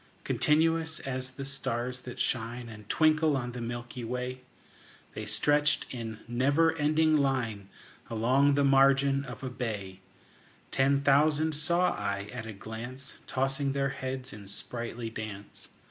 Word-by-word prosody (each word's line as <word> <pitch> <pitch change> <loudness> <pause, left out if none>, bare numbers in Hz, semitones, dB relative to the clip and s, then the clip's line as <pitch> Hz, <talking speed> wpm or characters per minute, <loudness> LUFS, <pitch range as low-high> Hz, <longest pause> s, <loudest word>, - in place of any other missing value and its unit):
Continuous 160 +1 +2
as 130 -1 -3
the 135 +1 -7
stars 125 -2 -2
that 125 -1 -8
shine 120 0 -1
And 105 -2 -11
twinkle 155 -2 +3
on 125 -1 -3
the 120 0 -6
milky 120 +1 -5
way, 125 +2 -4 0.7
The 110 - -5
stretched 145 +7 +3
in 115 -3 -6
never 140 +7 +3
ending 155 +1 +3
line 120 -8 0 0.4
Along 130 +5 +3
the 140 - +3
margin 135 0 +4
of 125 -1 -8
a 130 - -2
bay: 105 -7 -4 0.7
Ten 140 +1 +3
thousand 150 +3 +3
saw 170 +4 +2
I 100 0 -3
at 115 -3 -6
a - - -5
glance, 115 +6 -8
Tossing 135 +1 0
their 140 0 +1
heads 130 -1 -5
in 105 -1 -10
sprightly 115 +2 -5
dance. 105 -2 -7
130 Hz, 140 wpm, -30 LUFS, 115-140 Hz, 0.7 s, margin